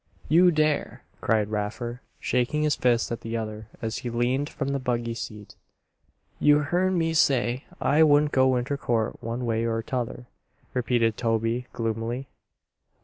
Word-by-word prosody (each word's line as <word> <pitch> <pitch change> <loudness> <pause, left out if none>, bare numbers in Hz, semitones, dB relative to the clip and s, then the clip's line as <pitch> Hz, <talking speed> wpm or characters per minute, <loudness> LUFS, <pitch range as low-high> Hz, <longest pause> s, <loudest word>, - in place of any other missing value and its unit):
"You 175 +3 +6
dare!" 155 -2 0 0.2
cried 110 -2 +1
Raffer, 120 +4 -3 0.2
shaking 125 +5 0
his 150 -2 +2
fist 120 -2 +1
at 115 - -3
the 115 0 -3
other 110 -1 -5 0.2
as 110 0 -2
he 125 - -4
leaned 125 +4 0
from 135 -2 -3
the 140 0 0
buggy 120 -2 -1
seat. 105 -3 -8 0.8
"You 150 0 +6
hearn 180 +5 +1
me 165 -1 +1
say 130 -4 +2
I 150 +3 +3
wouldn't 150 -1 +5
go 130 0 +4
inter 125 +3 -1
court 115 -5 -1
one 115 +2 -3
way 115 -1 0
or 115 -1 -1
'tother," 125 -2 -4 0.5
repeated 120 -3 +1
Toby, 115 +1 0
gloomily. 115 +3 -3
120 Hz, 150 wpm, -26 LUFS, 115-140 Hz, 0.8 s, You